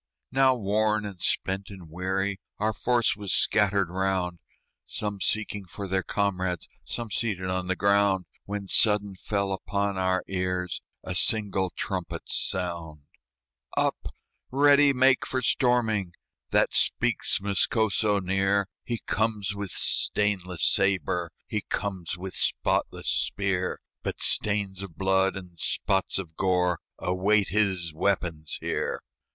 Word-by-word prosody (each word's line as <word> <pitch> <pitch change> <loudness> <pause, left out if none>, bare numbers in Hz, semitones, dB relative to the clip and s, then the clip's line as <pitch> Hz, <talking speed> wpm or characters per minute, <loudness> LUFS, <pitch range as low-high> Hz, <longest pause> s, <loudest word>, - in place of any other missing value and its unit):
Now 135 0 +4
worn 105 -1 +1
and 95 -4 -7
spent 95 +1 0
and 95 -4 -10
weary, 95 +4 -2 0.2
Our 110 +1 0
force 120 +2 +2
was 100 -2 -4
scattered 100 -3 +3
round, 95 -2 -1 0.4
Some 105 -2 -4
seeking 105 -2 -1
for 100 +2 -6
their 95 0 +1
comrades, 95 -4 -1 0.2
Some 115 -2 -4
seated 95 -5 -1
on 90 0 -2
the 95 - 0
ground, 100 -1 +3 0.2
When 100 -1 -4
sudden 105 -1 +3
fell 100 +1 -1
upon 100 0 -2
our 95 0 +1
ears 90 -2 -2 0.2
A 90 - -4
single 95 -1 +3
trumpet's 90 -1 -4
sound. 85 -5 -3 0.7
"Up! - - -1 0.3
ready 145 +1 +5
make 130 -1 +4
for 130 - -1
storming!" 110 -8 +1 0.3
That - - +3
speaks - - +2
Moscoso 105 +1 +1
near; 95 +1 +1 0.2
He 120 -2 -4
comes 105 -2 0
with 100 -1 -5
stainless 95 -4 0
sabre, 95 -3 +2
He 105 - -2
comes 95 -4 -3
with 95 +1 -6
spotless - - 0
spear; 95 -2 0 0.2
But - - -4
stains 100 -2 +1
of 95 -5 -9
blood 95 0 +2
and 90 -3 -9
spots 95 +3 0
of 85 -4 -6
gore 90 -2 +1 0.2
Await 95 +3 +2
his 95 -5 +1
weapons 85 -3 -1
here. - - -2
95 Hz, 125 wpm, -27 LUFS, 90-105 Hz, 0.7 s, ready